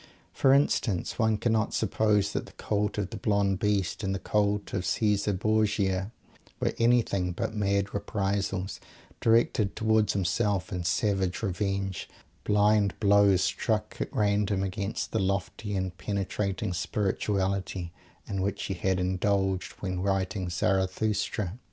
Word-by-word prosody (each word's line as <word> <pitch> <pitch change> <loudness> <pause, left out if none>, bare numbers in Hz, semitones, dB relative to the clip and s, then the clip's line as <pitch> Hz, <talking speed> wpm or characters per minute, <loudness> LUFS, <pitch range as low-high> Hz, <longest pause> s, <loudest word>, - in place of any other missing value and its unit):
For 135 - +3
instance, 130 -10 +1
one 110 -2 +3
cannot 110 -1 0
suppose 105 -1 +1
that - - -3
the - - -15
cult 105 0 -1
of 100 -1 -2
"the 115 - -5
Blonde 100 -2 +1
Beast," 105 -1 0
and 95 0 0
the - - -3
cult 105 0 0
of 95 - -1
Caesar 105 +3 +1
Borgia, 100 -1 +1 0.5
were - - 0
anything 115 -6 +2
but 85 - -3
mad 100 -1 0
reprisals, 100 -1 -2 0.4
directed 115 -3 +2
towards 110 -1 +2
himself, 100 +2 0
in 90 -1 -3
savage 95 +1 0
revenge; 95 -1 -2 0.3
blind 105 -1 +3
blows 100 -2 +5
struck 110 -2 -1
at - - -3
random 100 -1 +1
against 100 +2 -3
the 110 - 0
lofty 100 +2 -2
and 95 -2 -2
penetrating 100 0 -2
spirituality 95 -1 -1 0.3
in 95 -1 -2
which 100 +1 -2
he 95 - -2
had 95 +1 0
indulged 95 +1 0
when 90 -2 -2
writing 95 -1 -1
Zarathustra. 95 +2 0
100 Hz, 135 wpm, -28 LUFS, 95-105 Hz, 0.5 s, blows